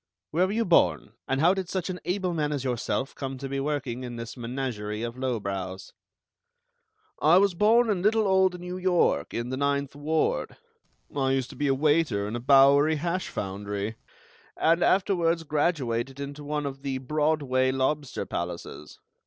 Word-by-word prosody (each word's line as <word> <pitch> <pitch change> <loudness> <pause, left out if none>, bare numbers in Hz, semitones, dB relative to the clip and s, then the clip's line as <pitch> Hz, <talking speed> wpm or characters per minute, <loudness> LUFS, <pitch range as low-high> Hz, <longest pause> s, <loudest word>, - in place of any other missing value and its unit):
Where 180 +4 +2
were - - -3
you 230 +1 +1
born, 85 - +3
and 135 - 0
how 175 +3 +5
did 190 -2 -4
such 185 -3 -2
an 180 - -6
able 185 -1 -1
man 150 -2 -1
as 140 -3 -2
yourself 130 +1 -2
come 135 -1 -5
to 135 +1 -5
be 135 0 -3
working 135 -4 -2
in 120 -1 -6
this 115 -1 -7
menagerie 115 -4 -4
of 120 0 -4
lowbrows?" 100 -7 -4 1.3
"I 160 +4 +6
was 200 0 +4
born 225 +6 +4
in 200 -5 0
little 215 +2 +3
old 190 -1 +3
New 180 +1 -6
York, 180 - +1
in 120 +1 -3
the 130 - -2
Ninth 140 0 -1
Ward. 160 - -1 0.6
I 135 -2 +1
used 130 -2 -1
to - - -11
be 145 - -1
a 135 - +3
waiter 145 -8 +2
in 105 - -4
a - - -2
Bowery 140 +4 +5
hash 175 +4 -2
foundry, 100 +2 -4 0.6
and 165 +2 +3
afterwards 175 -4 +2
graduated 140 -5 -1
into 140 +1 -6
one 150 0 -2
of 135 -1 -5
the 135 -1 -2
Broadway 140 -2 +1
lobster 135 +2 -1
palaces. 75 - -6
140 Hz, 170 wpm, -27 LUFS, 125-170 Hz, 1.3 s, I